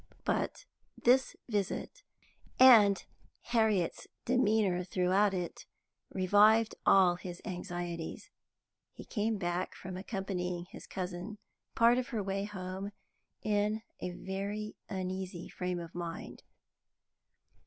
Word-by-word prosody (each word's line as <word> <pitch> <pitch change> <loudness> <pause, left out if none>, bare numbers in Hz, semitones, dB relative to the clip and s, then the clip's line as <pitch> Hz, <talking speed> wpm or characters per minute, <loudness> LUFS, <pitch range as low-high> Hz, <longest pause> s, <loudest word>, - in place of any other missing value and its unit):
But - - -1 0.3
this 260 +2 +3
visit, 205 -5 -2 0.6
and 220 -7 +8 0.4
Harriet's 220 -7 +1 0.2
demeanour 215 -7 +2
throughout 185 +3 +2
it, 180 -2 -4 0.4
revived 210 +4 +5
all 180 -2 +6
his 175 -1 -7
anxieties. 175 -3 -5 0.6
He - - -10
came 220 -1 -1
back 175 -1 -2
from 185 0 -7
accompanying 185 -3 -3
his - - -12
cousin 185 +3 -5 0.4
part 235 +2 +5
of 250 - -3
her 220 -3 -2
way 195 +1 -2
home 195 0 -5 0.5
in 210 +1 +1 0.2
a - - -3
very 200 +4 -4
uneasy 185 -2 -4
frame 180 -1 -3
of 170 0 -8
mind. 170 -1 -6
195 Hz, 105 wpm, -32 LUFS, 180-215 Hz, 0.6 s, and